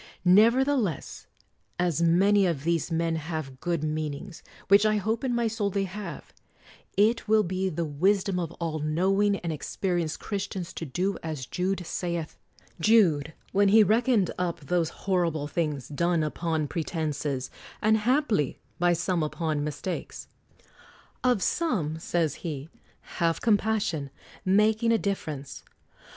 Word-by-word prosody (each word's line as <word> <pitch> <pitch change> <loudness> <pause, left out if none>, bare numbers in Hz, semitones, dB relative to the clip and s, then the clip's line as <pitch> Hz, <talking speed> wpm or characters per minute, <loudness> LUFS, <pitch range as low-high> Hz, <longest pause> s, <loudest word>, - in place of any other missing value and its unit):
Nevertheless, 230 - +3 0.5
as 175 -2 0
many 190 +4 +4
of 155 -6 -2
these 170 +1 0
men 165 0 0
have 155 -4 -5
good 170 -1 -1
meanings, 155 +3 -4 0.3
which 200 +2 +6
I 215 0 +3
hope 220 +4 -1
in 250 -2 0
my 235 0 +1
soul 220 -2 0
they 200 0 -1
have, 190 -4 -7 0.6
it 220 +4 +3
will 215 0 +4
be 185 +1 -1
the 170 -1 -2
wisdom 185 +5 +1
of 170 -2 -3
all 165 -2 -3
knowing 190 +7 +2
and 170 -2 -2
experienced 170 +1 -2
Christians 195 -3 -4
to 165 - -5
do 185 +8 -1
as 155 -5 -4
Jude 185 +4 -2
saith 170 -2 -3 0.2
— - - -31
Jude, 160 -7 +4 0.2
when 200 +1 +4
he 215 +2 +7
reckoned 220 -2 +2
up 175 -3 -2
those 165 +2 0 0.2
horrible 170 -6 +1
things, 150 -4 -2
done 170 +2 +1
upon 155 0 -1
pretenses, 150 -5 -3 0.3
and 220 +1 +3
haply 230 - +1 0.2
by 175 0 +4
some 175 0 0
upon 155 -1 -1
mis 150 -1 -4
takes: 185 - -5 1.0
"Of 245 -7 +2
some," 175 - 0
says 165 -3 0
he, 155 -3 -5 0.5
"have 165 -1 +2
compassion, 210 - +1 0.4
making 215 +4 +3
a 230 - +4
difference 155 -10 -4
175 Hz, 140 wpm, -27 LUFS, 155-205 Hz, 1.0 s, he